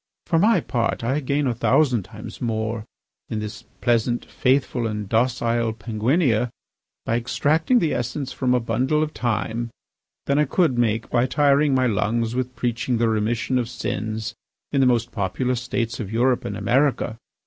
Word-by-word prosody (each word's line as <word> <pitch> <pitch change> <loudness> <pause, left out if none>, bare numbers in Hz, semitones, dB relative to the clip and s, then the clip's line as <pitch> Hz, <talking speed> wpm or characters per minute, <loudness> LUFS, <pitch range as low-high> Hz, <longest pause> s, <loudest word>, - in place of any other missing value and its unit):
For 165 - +2
my 220 +6 +4
part, 115 -2 -1
I 130 +5 +1
gain 140 +1 0
a 125 - +1
thousand 125 0 +3
times - - -10
more, 110 -1 -2 0.4
in 110 - -2
this 105 +1 -6 0.2
pleasant, 120 0 +1
faithful, 130 -2 +1
and 105 -2 -4
docile 115 0 +1
Penguinia, 115 - +1 0.6
by 115 - +1
extracting 155 - +2
the 165 -9 +2
essence 130 +3 -3
from 125 -2 +1
a - - +3
bundle 130 +7 +1
of 155 - -3
thyme, 120 -1 -2 0.6
than 140 +1 +2
I 150 - +4
could 155 -1 +2
make 115 -2 0
by 120 +1 +3
tiring 145 0 +3
my 130 -1 +3
lungs 115 +1 0
with 125 0 -2
preaching 120 0 -1
the 115 0 +2
remission 115 +4 0
of 120 -2 -2
sins 110 -2 -3 0.4
in 140 - +2
the 130 - +5
most 120 -1 +1
populous 120 +5 -1
states 120 0 -2
of 105 -4 -5
Europe 125 +2 +2
and 100 - -3
America. 125 +1 +1
120 Hz, 165 wpm, -23 LUFS, 115-130 Hz, 0.6 s, the